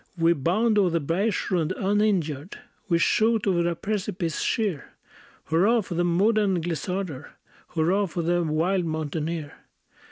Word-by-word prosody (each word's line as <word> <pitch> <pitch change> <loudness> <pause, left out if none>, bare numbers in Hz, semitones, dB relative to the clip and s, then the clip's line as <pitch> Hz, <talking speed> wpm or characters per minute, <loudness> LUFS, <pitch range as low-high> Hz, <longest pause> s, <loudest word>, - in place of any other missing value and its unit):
We 165 0 +4
bound 210 - +1
o'er 190 -3 +3
the 170 0 0
bergschrund 180 +1 0
uninjured, 190 -6 0 0.3
We 170 - +3
shoot 220 +6 +2
o'er 175 -3 +2
a 170 - -2
precipice 190 -3 -3
sheer; 200 - -1 0.5
Hurrah, 200 +9 +3
for 185 - -7
the 175 +1 +1
modern 195 +2 +2
glissader! 170 -2 -4 0.4
Hurrah, 185 +5 +2
for 170 0 -3
the 175 +1 +1
wild 170 +3 0
mountaineer! 155 0 -3
175 Hz, 130 wpm, -25 LUFS, 165-200 Hz, 0.5 s, We